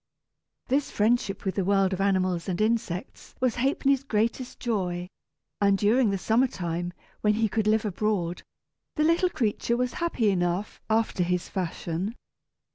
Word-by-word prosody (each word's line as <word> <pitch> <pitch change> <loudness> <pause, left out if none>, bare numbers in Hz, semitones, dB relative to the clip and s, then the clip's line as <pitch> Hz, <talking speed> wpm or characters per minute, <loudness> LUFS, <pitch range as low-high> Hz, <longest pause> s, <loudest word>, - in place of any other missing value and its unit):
This 275 +2 +1
friendship 210 -2 +1
with 190 - 0
the 195 - 0
world 195 0 +2
of 190 - -2
animals 185 -2 +1
and 180 - -2
insects 215 -5 -2
was 255 -2 +1
Ha'penny's 275 +1 +2
greatest 235 +1 -1
joy, 180 -7 -2 0.5
and 200 -1 +4
during 220 +4 +3
the 195 - 0
summer 230 +7 +2
time, 175 -4 -3 0.3
when 210 0 +3
he 220 0 +2
could 215 0 -1
live 220 0 +3
abroad, 195 -3 -1 0.5
the 305 - +2
little 335 +3 +3
creature 235 -3 0
was 250 -1 -1
happy 240 -11 +2
enough, 175 +2 -1
after 220 -3 +1
his 180 0 0
fashion. 180 +2 -3
210 Hz, 150 wpm, -27 LUFS, 185-235 Hz, 0.5 s, and